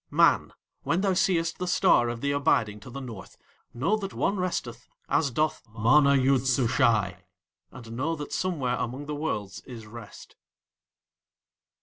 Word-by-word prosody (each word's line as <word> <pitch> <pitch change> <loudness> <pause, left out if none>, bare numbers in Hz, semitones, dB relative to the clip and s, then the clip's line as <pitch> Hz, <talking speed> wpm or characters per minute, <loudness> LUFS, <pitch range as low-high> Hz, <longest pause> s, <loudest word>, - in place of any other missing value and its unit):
Man, - - +3 0.3
when 170 +3 0
thou 195 -1 +2
seest 175 -3 +1
the 180 - -2
Star 120 -8 +3
of 120 -1 -5
the 140 - 0
Abiding 125 -8 +1
to 115 - -12
the 135 +3 -7
North, 115 -7 -9 0.3
know 160 - 0
that 200 -2 -6
one 200 - 0
resteth 135 -10 -3 0.2
as 145 -1 +2
doth 155 +5 -1 0.2
MANA 140 +5 +5
YOOD 135 -1 +2
SUSHAI, 115 -6 +2 0.5
and 115 -3 -11
know 145 +8 -2
that 145 -2 -7
somewhere 140 -10 -1
among 130 +5 -4
the 150 - -4
Worlds 105 -10 -4
is 120 -4 -9
rest. 110 0 -12
130 Hz, 150 wpm, -27 LUFS, 115-160 Hz, 0.5 s, MANA